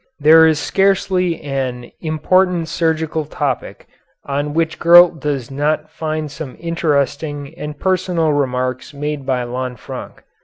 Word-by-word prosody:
There 160 +2 +7
is 160 -1 +2
scarcely 185 -2 +1
an 130 -4 -4
important 175 +2 +1
surgical 160 -1 -1
topic 145 -3 -3 0.4
on 145 +1 -2
which 165 -1 0
Gurlt 175 -1 +7
does 140 -4 -3
not 150 +2 -1
find 155 -2 -3
some 145 -2 -8
interesting 145 -3 -1
and 150 -1 -7
personal 180 -4 +1
remarks 130 0 -2
made 145 -1 -4
by 125 -2 0
Lanfranc. 125 -1 -6
150 Hz, 120 wpm, -18 LUFS, 140-165 Hz, 0.4 s, There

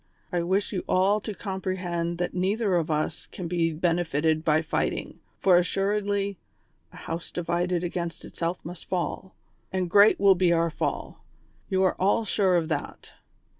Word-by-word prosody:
I 175 -2 0
wish 190 +5 0
you 185 - -2
all 195 +3 +3
to 210 -1 -5
comprehend 185 -4 -3
that 175 0 -2
neither 195 +3 0
of 165 -2 0
us 155 -1 -2
can 180 - -6
be 165 -1 +1
benefited 160 -2 +1
by 155 0 +3
fighting, 160 - -2 0.2
for 185 -2 +5
assuredly 200 +1 0 0.3
' - - -42
a - - -16
Jiov.se 165 +1 -5
divided 175 0 0
against 170 -1 -4
itself 170 +2 -4
must 175 +1 -8
fall,'' 185 +1 -3 0.4
and 185 -2 -2
great 205 +2 +6
will 200 -1 +7
be 180 -1 +2
our 170 -1 +2
fall; - - -4 0.5
you 190 -1 +2
are 185 - +3
all 200 +4 +2
sure 195 -3 +2
of 165 -2 +1
that. 155 -3 -5
180 Hz, 165 wpm, -26 LUFS, 170-190 Hz, 0.5 s, will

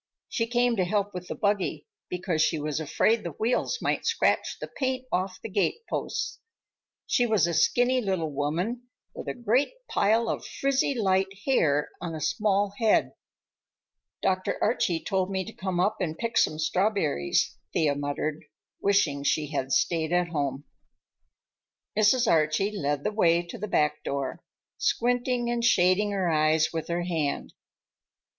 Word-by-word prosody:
She 230 -2 -1
came 240 0 +2
to 185 - +3
help 205 +2 -1
with 180 0 -6
the - - -4
buggy, 200 -7 -1 0.2
because 180 -3 -1
she 160 - +2
was 150 0 -2
afraid 215 +9 +2
the 170 -3 -5
wheels 235 - 0
might - - 0
scratch 460 0 +1
the - - -5
paint 260 -1 -1
off 185 +1 -1
the - - -3
gateposts. 215 - -2 0.7
She 245 -2 +2
was 215 -7 +3
a 170 - -1
skinny 250 +8 +3
little 185 -7 -1
woman 175 - -2 0.3
with - - -8
a - - -3
great 245 - +1
pile 225 +3 +2
of - - -2
frizzy 275 0 0
light 190 -4 +2 0.2
hair 150 - +2
on 165 -2 -4
a - - -5
small 205 0 +1
head. 225 -2 +3 1.1
"Dr. 185 0 0
Archie 170 -2 +1
told 190 -2 0
me 190 -1 -2
to 225 - -9
come 185 -2 -3
up 200 +4 +2
and 160 -3 -2
pick 230 -1 -3
some 155 - +3
strawberries," 160 - +1 0.2
Thea 150 -3 +2
muttered, 145 +2 -3 0.4
wishing 180 -8 +2
she 150 +1 0
had 135 -2 -2
stayed 165 +1 +1
at 175 -1 +2
home. 140 -4 -2 1.3
Mrs. 225 +4 +4
Archie 165 +4 +2
led 145 -5 -1
the 210 - 0
way 175 -5 +3
to 170 - -8
the 210 - -3
back 150 -6 +1
door, 140 -1 -3 0.4
squinting 245 0 +1
and 240 -1 -1
shading 195 -2 +4
her 195 -3 0
eyes 155 0 +3
with 160 -1 -3
her 175 +1 -1
hand. 160 -5 -2
185 Hz, 155 wpm, -27 LUFS, 155-220 Hz, 1.3 s, Mrs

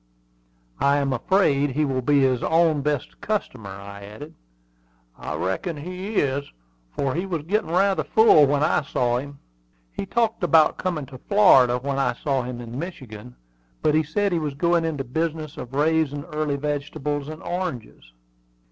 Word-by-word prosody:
"I 140 +1 +3
am 140 -2 0
afraid 145 0 +2
he 150 +3 +1
will 130 -2 -1
be 140 +2 +3
his 130 -2 +2
own 160 -2 +2
best 145 -2 -3
customer," 130 - -3
I 100 +1 -9
added. 110 +10 -10 0.8
"I - - -6
reckon 95 - -2
he 185 +7 -6
is, 140 -2 0 0.4
for 135 - -2
he 180 +4 -2
was 165 -5 -3
getting 200 +3 -1
rather 195 +3 +2
full 220 -10 +6
when 145 +1 +1
I 155 - +2
saw 125 -3 0
him." 140 +1 -9 0.6
"He 195 - -5
talked 230 -1 0
about 160 -3 +4
coming 170 -6 -2
to 130 -1 -12
Florida 135 - +5
when 135 +2 -3
I 125 -2 +1
saw 135 +1 -1
him 125 -1 -6
in 120 +1 -7
Michigan; 125 - -8 0.5
but 150 - +3
he 155 - +4
said 200 +6 -1
he 170 - +1
was 150 -3 -3
going 170 +2 +2
into 150 -4 -2
the 125 - -18
business 160 -1 -2
of 125 +2 -8
raising 150 -1 +1
early 150 -3 -2
vegetables 145 0 -3
and 155 +1 -8
oranges." 170 - -5
145 Hz, 170 wpm, -23 LUFS, 130-165 Hz, 0.8 s, full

